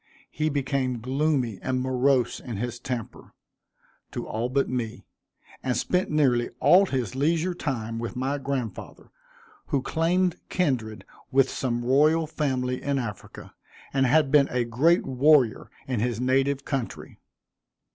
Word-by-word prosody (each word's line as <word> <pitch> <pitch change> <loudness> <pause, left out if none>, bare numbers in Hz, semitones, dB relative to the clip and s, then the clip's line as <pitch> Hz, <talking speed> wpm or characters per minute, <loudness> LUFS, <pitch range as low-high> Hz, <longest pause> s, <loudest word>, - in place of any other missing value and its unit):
He 155 0 -1
became 135 -3 -1
gloomy 130 -3 0
and 130 -1 -1
morose 130 -1 +1
in 115 -5 -6
his 120 +2 -4
temper, 125 -4 -6 0.8
to - - -5
all 115 +3 -2
but 135 +2 +1
me; 120 -3 -4 0.6
and 125 -3 -1
spent 180 +9 0
nearly 130 -6 +2
all 190 +3 +6
his 130 - -2
leisure 165 +6 +1
time 115 -8 -3
with 120 +1 -5
my 135 +3 -1
grandfather, 135 -4 -5 0.6
who 140 -3 0
claimed 175 +2 +1
kindred 125 - -1 0.2
with 135 0 +3
some 120 -2 -2
royal 155 +5 +4
family 130 -5 -2
in 140 -1 -1
Africa, 110 -7 -7 0.4
and 135 -1 +3
had 145 +1 +3
been 140 -2 +5
a 125 -1 0
great 140 +10 +2
warrior 130 -4 +3 0.2
in 125 -4 -1
his 120 0 -1
native 135 +2 +1
country. 135 -4 -5
130 Hz, 135 wpm, -26 LUFS, 120-145 Hz, 0.8 s, all